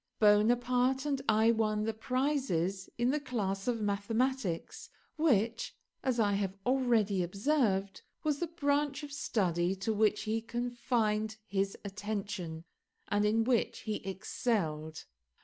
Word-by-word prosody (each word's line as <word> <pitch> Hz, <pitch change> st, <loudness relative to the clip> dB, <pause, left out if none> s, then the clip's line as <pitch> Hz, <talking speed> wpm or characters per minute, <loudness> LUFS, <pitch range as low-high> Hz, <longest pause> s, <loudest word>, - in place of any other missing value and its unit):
Bonaparte 245 Hz, +5 st, +3 dB
and 280 Hz, -2 st, 0 dB
I 220 Hz, +1 st, +5 dB
won 215 Hz, -2 st, +1 dB
the 225 Hz, +1 st, -1 dB
prizes 225 Hz, -, -1 dB
in 240 Hz, +1 st, +2 dB
the 300 Hz, -, +1 dB
class 205 Hz, -8 st, -2 dB
of 240 Hz, -2 st, +1 dB
mathematics, 210 Hz, 0 st, -1 dB, 0.3 s
which, 235 Hz, -7 st, +1 dB, 0.3 s
as 255 Hz, -3 st, 0 dB
I 205 Hz, -2 st, +3 dB
have 195 Hz, -1 st, -1 dB
already 235 Hz, -7 st, +2 dB
observed, 195 Hz, -, 0 dB, 0.2 s
was 300 Hz, -2 st, 0 dB
the 345 Hz, -, -1 dB
branch 290 Hz, -2 st, 0 dB
of 290 Hz, -, -7 dB
study 185 Hz, -9 st, 0 dB
to 195 Hz, +4 st, -1 dB
which 215 Hz, 0 st, +2 dB
he 220 Hz, +1 st, -1 dB
confined 230 Hz, -2 st, -1 dB
his 195 Hz, 0 st, -1 dB
attention, 200 Hz, -5 st, -4 dB, 0.5 s
and 205 Hz, 0 st, +2 dB
in 220 Hz, +2 st, +3 dB
which 240 Hz, 0 st, +1 dB
he 215 Hz, -2 st, -2 dB
excelled. 185 Hz, -, -2 dB
220 Hz, 130 wpm, -32 LUFS, 200-255 Hz, 0.5 s, I